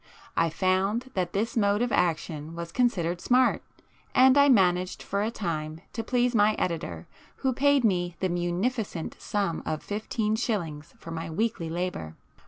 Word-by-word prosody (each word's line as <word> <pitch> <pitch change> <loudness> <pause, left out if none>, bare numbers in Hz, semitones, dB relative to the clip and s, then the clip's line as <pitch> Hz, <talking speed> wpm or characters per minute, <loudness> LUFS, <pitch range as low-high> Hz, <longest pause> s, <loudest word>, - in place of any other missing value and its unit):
I 165 0 +3
found 195 +8 0
that 180 -2 -1
this 215 +4 -1
mode 205 0 +2
of 245 - -1
action 160 -2 -1
was 170 0 -6
considered 180 -8 0
'smart,' 255 +1 +3 0.5
and 260 +1 +7
I 285 0 +6
managed 185 -6 +3
for 200 +1 -1
a 215 - 0
time 160 -7 -4
to 225 - -3
please 245 +1 +1
my 210 -1 +4
editor 170 -2 -3 0.4
who 260 - +3
paid 285 +1 +3
me 175 -5 +1
the 190 - +1
munificent 175 +2 -2
sum 200 -6 -1
of 155 - -3
fifteen 215 +1 -1
shillings 170 -9 -3
for 165 - -10
my 165 0 -4
weekly 175 -1 -1
labour. 165 - -3
190 Hz, 160 wpm, -27 LUFS, 170-230 Hz, 0.5 s, and